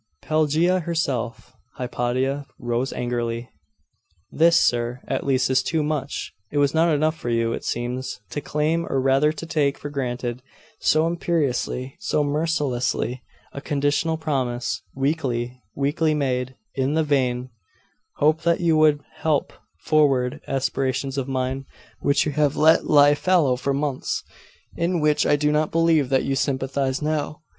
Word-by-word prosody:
'Pelagia 155 +4 +2
herself!' 135 -9 -3 0.2
Hypatia 130 +3 -2
rose 120 +2 -2
angrily. 120 -1 -3 0.8
'This, 170 +1 +5
sir, 120 +1 +1
at - - -2
least, 130 -2 +2
is 130 0 +4
too 160 +1 0
much! 150 -2 -3 0.2
It 145 - -3
was 140 -1 +3
not 165 +1 +3
enough 155 +1 +2
for 120 - -5
you, 115 0 +1
it - - -5
seems, 125 +2 -3
to 145 - -3
claim, 155 +4 0
or 135 - +1
rather 135 +3 +3
to 155 +1 -7
take 150 -4 0
for 145 - -7
granted, 125 -3 -3 0.4
so 155 +1 +3
imperiously, 150 -6 -1
so 150 - 0
mercilessly, 145 -5 -1 0.3
a 140 - -6
conditional 145 +3 0
promise 125 - -2
weakly, 130 -4 -1
weakly 150 +3 +1
made, 130 -3 -1 0.2
in 135 +2 0
the 160 - +3
vain 130 -4 0 0.6
hope 155 +2 +2
that 170 -1 +2
you 170 -3 +2
would 155 -2 +4 0.2
help 155 -3 0 0.3
forward 140 -3 +2
aspirations 135 0 -1
of 135 -2 -2
mine 130 0 -2 0.3
which 140 0 +2
you 150 - -1
have 145 -1 +1
let 160 +2 +5
lie 145 -1 +6
fallow 155 -4 +2
for 130 +3 -2
months 140 -1 -2 0.5
in 170 +1 0
which 150 -1 +2
I 145 - +4
do 150 0 +1
not 150 0 +1
believe 165 -5 +2
that 135 -1 +2
you 135 - -1
sympathise 135 +1 -1
now! 155 0 -2
140 Hz, 150 wpm, -23 LUFS, 130-155 Hz, 0.8 s, lie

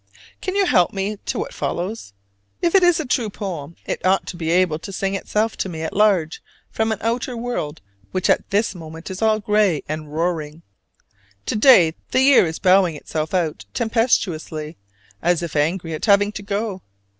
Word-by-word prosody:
Can 375 - -3
you 400 -1 +3
help 185 - +3
me 200 +2 -2
to - - -1
what - - -4
follows? 180 - -4 0.5
If 340 - +1
it 390 - +6
is 350 -2 +4
a 315 - -2
true 245 -4 0
poem 170 -7 -6
it - - -4
ought 190 +1 +3
now - - -6
to - - -12
be 165 -2 -3
able 175 -2 +2
to 165 +4 -8
sing 195 0 -2
itself 215 +3 -1
to 190 - -2
me 160 -2 -5
at 160 - -4
large 190 -6 +2 0.3
from 220 0 0
an 220 - -1
outer 235 +2 -2
world 230 -11 -4 0.3
which 185 -1 0
at - - +1
this 205 0 +1
moment 165 0 -9
is 190 - -6
all 220 -1 +3
gray 210 -6 +2
and 155 0 -5
roaring. 160 -1 -2 0.8
To - - -2
day 210 - +6 0.2
the 260 - +2
year 265 -9 +6
is 160 - -4
bowing 185 -3 +4
itself 155 +3 -4
out 155 - -1
tempestuously, 180 -10 0 0.5
as 175 0 +1
if 170 - -5
angry 165 +3 0
at 155 - -3
having 205 0 +4
to 210 - -7
go. 200 -1 -3
190 Hz, 190 wpm, -21 LUFS, 160-215 Hz, 0.8 s, it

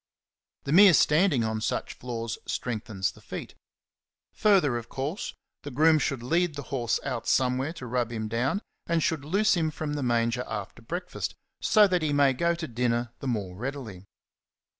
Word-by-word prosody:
The 140 - -3
mere 185 +1 +8
standing 150 -5 +4
on 110 -1 -2
such - - -2
floors 115 -2 -5
strengthens 105 -5 -2
the - - -18
feet. - - -7 0.8
Further, 190 - +3
of 120 -1 -5
course, 145 - -4 0.3
the 145 - -7
groom 155 +4 +4
should 135 -4 -2
lead 165 +4 +1
the 145 - -5
horse 120 -3 0
out 125 -4 -3
somewhere 130 +3 +2
to 135 - -8
rub 120 -1 -1
him 110 -2 -3
down, 125 - -1 0.2
and 170 -2 +1
should 160 -4 0
loose 200 +8 +2
him 160 -2 +1
from 155 -1 -4
the 145 - -2
manger 120 0 +1
after 105 +1 -6
breakfast, 175 +9 -4 0.3
so 215 -2 +6
that 180 -2 +1
he 155 -2 0
may 140 -2 +4
go 170 +6 +1
to 170 -2 -5
dinner 120 -1 -1
the 135 - -5
more 100 -7 -2
readily. 115 -5 -6
130 Hz, 175 wpm, -27 LUFS, 115-160 Hz, 0.8 s, mere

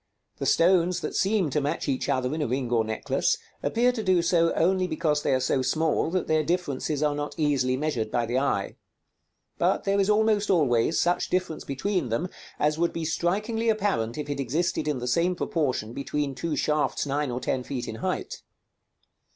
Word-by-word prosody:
The - - -2
stones 180 0 +3
that - - -4
seem 195 -6 +1
to 150 - +1
match 145 +1 -2
each 135 -2 -1
other 130 +1 0
in 155 - -2
a 150 - 0
ring 125 0 -2
or 115 -2 +3
necklace, 110 0 0 0.2
appear 245 +2 +2
to 240 -3 -4
do 185 -4 +2
so 170 -1 +3
only 185 +2 +2
because 155 -3 0
they - - 0
are 130 - +3
so 130 +1 +1
small 155 +5 +1
that 185 +1 -1
their 155 0 +2
differences 155 -3 -1
are 150 -1 +2
not 145 0 -4
easily 135 -4 +1
measured 130 -7 -1
by 120 +1 0
the 120 +3 0
eye; 130 -8 -1 0.8
but - - +2
there 200 0 +1
is 195 +1 +2
almost 210 -1 +2
always 150 -5 +3
such 175 +1 +1
difference 180 -3 -1
between 140 - -2
them 135 +11 -1 0.3
as 150 +1 +1
would 170 0 +1
be 165 -1 -3
strikingly 210 +8 0
apparent 195 - 0
if 150 - -4
it 145 -1 -3
existed 150 +6 -1
in 150 -3 0
the 125 0 -4
same 170 +8 +2
proportion 130 -11 -1
between 140 +1 -2
two 160 +3 -3
shafts 150 +2 0
nine 145 0 -1
or 125 0 -3
ten 130 0 -1
feet 125 -1 -5
in 110 - -5
height. - - -3
150 Hz, 195 wpm, -26 LUFS, 130-180 Hz, 0.8 s, stones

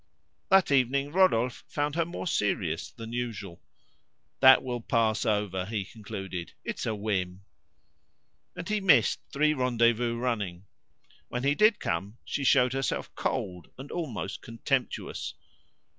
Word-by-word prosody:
That 190 -5 +5
evening 140 +1 +2
Rodolphe 130 -10 +3
found 145 0 -1
her 165 +1 +1
more 170 +2 -6
serious 90 - -1
than 115 -1 -9
usual. 110 -7 -4 0.8
"That 130 -1 +8
will 120 -2 -3
pass 115 -2 +1
over," 105 -4 0
he 105 -3 -2
concluded; 95 -5 -7
"it's - - -4
a 110 - 0
whim:" 95 -3 -2 1.1
And 180 -1 -6
he 210 -1 0
missed 180 -7 +4
three 150 +2 +3
rendezvous 120 -3 +2
running. 105 -7 -2 0.6
When 125 +1 -4
he 140 +1 +3
did 210 +6 +4
come, 95 +7 -3
she 140 - -3
showed 125 -1 +4
herself 135 -1 -2
cold 90 -2 -3
and 135 +2 -9
almost 125 - -4
contemptuous. 120 +3 -3
120 Hz, 130 wpm, -28 LUFS, 105-140 Hz, 1.1 s, That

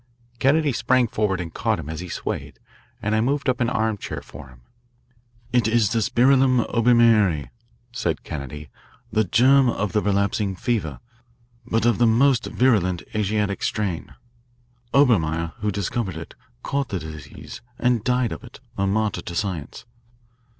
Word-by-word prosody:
Kennedy 145 +3 +3
sprang 130 0 +2
forward 105 -4 -1
and 85 -2 -6
caught - - 0
him - - -7
as 80 0 -5
he 90 0 -7
swayed, - - -5 0.5
and 105 - 0
I 110 - +2
moved 140 +5 0
up 130 -1 +1
an 120 - +2
armchair 110 -4 -2
for 70 0 -11
him. 65 -2 -18 0.9
It 120 -3 +3
is 110 -2 +2
the 115 -1 +1
spirillum 130 +2 +3
Obermeieri," 115 - +4 0.4
said 90 -10 -2
Kennedy, 75 +1 -7 0.4
"the 110 0 +2
germ 130 +7 +4
of 105 -3 -2
the 105 - +1
relapsing 100 0 0
fever, 90 - -2 0.7
but 115 +1 0
of 120 -2 +2
the 120 - +5
most 125 +3 +3
virulent 100 -9 +1
Asiatic 105 -1 -1
strain. 100 -6 -2 0.8
Obermeyer, 85 - +2
who 105 - -1
discovered 100 -1 -2
it, 80 - -8 0.3
caught 140 -1 -2
the 100 - -2
disease 75 -4 -9 0.2
and 120 -3 +1
died 125 -2 +1
of - - -7
it, - - -13 0.2
a 100 - +1
martyr 110 +1 0
to 85 - -7
science." 85 -7 -4
110 Hz, 150 wpm, -23 LUFS, 90-120 Hz, 0.9 s, the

